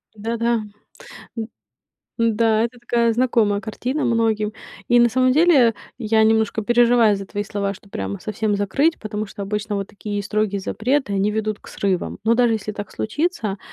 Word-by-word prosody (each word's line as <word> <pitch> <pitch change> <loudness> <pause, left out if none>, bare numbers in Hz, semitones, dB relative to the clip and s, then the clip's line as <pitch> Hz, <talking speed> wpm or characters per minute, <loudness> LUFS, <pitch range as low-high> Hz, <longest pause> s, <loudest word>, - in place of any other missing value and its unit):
Да-да, 230 +2 -1 0.8
м, 220 -1 -3 0.7
м-да, 225 -1 +2
это 240 +1 -5
такая 235 -1 +1
знакомая 225 -4 +2
картина 250 +7 -3
многим. 225 -2 +1 0.4
И 240 - +5
на 240 - +5
самом 255 +1 +3
деле 285 -7 +5 0.2
я 220 -2 +2
немножко 220 0 +2
переживаю 240 -1 +4
за 195 0 -7
твои 205 +1 -4
слова, 200 0 -2
что 200 - -17
прямо 100 - -4
совсем 215 -1 -1
закрыть, 275 - +1
потому 215 -1 -4
что 200 - -8
обычно 210 +1 -3
вот 195 -1 -4
такие 205 0 -5
строгие 210 -1 -1
запреты, 250 +4 -1
они 200 +2 +1
ведут 215 -1 -2
к - - -14
срывам. 190 -3 -2
Но 225 - +4
даже 240 -1 +3
если 215 -1 -4
так 205 0 -7
случится, 230 - -2
220 Hz, 165 wpm, -21 LUFS, 205-235 Hz, 0.8 s, И